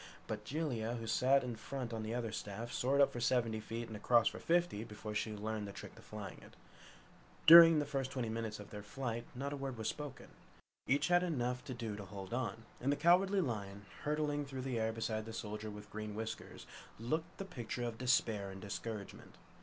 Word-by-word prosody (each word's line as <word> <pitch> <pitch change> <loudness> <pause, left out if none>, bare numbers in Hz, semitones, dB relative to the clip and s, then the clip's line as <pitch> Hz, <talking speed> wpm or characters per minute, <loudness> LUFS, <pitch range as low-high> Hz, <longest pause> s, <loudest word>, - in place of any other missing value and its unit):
But 105 -1 -5
Jellia, 120 -6 -1
who 115 - -5
sat 130 +5 +4
in 125 -2 -3
front 120 +1 -5
on 110 - -2
the 110 +2 -3
other 115 -3 -2
staff 110 +2 -5
soared 140 +3 +3
up 140 - +5
for 120 - -3
seventy 115 -2 +2
feet 115 +2 -5
and 110 - -7
across 115 +2 +4
for - - -1
fifty 170 -10 +1
before 105 -1 -7
she 105 +1 -1
learned 105 0 -3
the - - -6
trick - - -9
of - - -14
flying 105 -4 -7
it. - - -15 0.9
During 165 0 +11
the 145 - +2
first 135 -2 -2
twenty 125 -3 -2
minutes 110 -1 -3
of 105 - -10
their 105 - -6
flight, 120 +2 -4
not 140 +3 -3
a - - -2
word 135 -3 -4
was 110 - -2
spoken. 145 -2 -6 0.6
Each 140 +5 +3
had 175 0 +6
enough 125 -8 -1
to 130 - -5
do 115 -3 -4
to 100 -1 -7
hold 95 0 -7
on, 115 -2 -2 0.2
and 135 +3 +1
the - - +3
Cowardly 190 +5 +4
Lion, 100 - -4 0.2
hurtling 150 -1 0
through 135 -2 -5
the 130 -3 -1
air 110 0 +1
beside 110 -1 -2
the 115 - -7
Soldier 105 -1 -4
with 105 0 -9
Green 105 -1 -5
Whiskers, 110 +1 -5 0.3
looked 160 +10 -2
the 195 - -4
picture 120 -7 -4
of 115 -2 -3
despair 110 -5 +2
and 95 0 -8
discouragement. 105 0 -6
115 Hz, 210 wpm, -36 LUFS, 110-135 Hz, 0.9 s, During